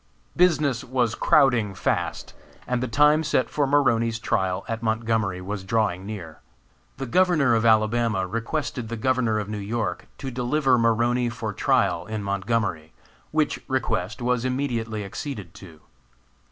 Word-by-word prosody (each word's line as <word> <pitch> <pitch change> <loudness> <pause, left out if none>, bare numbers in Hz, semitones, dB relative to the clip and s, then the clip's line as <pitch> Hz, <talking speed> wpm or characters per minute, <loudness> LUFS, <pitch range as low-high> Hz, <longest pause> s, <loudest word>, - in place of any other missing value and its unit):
Business 150 -8 +2
was 125 -3 0
crowding 120 -9 +3
fast, - - -2 0.3
and 125 -1 -1
the 130 - -1
time 150 +6 +4
set 150 -4 0
for 145 -2 +1
Maroney's 115 -5 +2
trial 95 -4 -1
at 115 -1 -3
Montgomery 110 -4 0
was 100 +1 -5
drawing 100 -2 0
near. 90 -8 -7 0.6
The 135 - -4
Governor 155 -3 +3
of 115 0 +2
Alabama 110 -2 +2
requested 115 - -3
the 115 - -4
Governor 120 -2 +1
of 105 -1 -3
New 105 0 -4
York 110 +2 -3
to 135 -2 -5
deliver 125 +1 +2
Maroney 120 +2 +2
for 110 -2 -5
trial - - +1
in 110 -1 -4
Montgomery, 100 -5 -2 0.4
which 155 -1 0
request 120 -5 -2
was 125 -1 +1
immediately 120 -5 -2
acceded 100 - -6
to. 85 -6 -13
115 Hz, 140 wpm, -24 LUFS, 105-130 Hz, 0.6 s, time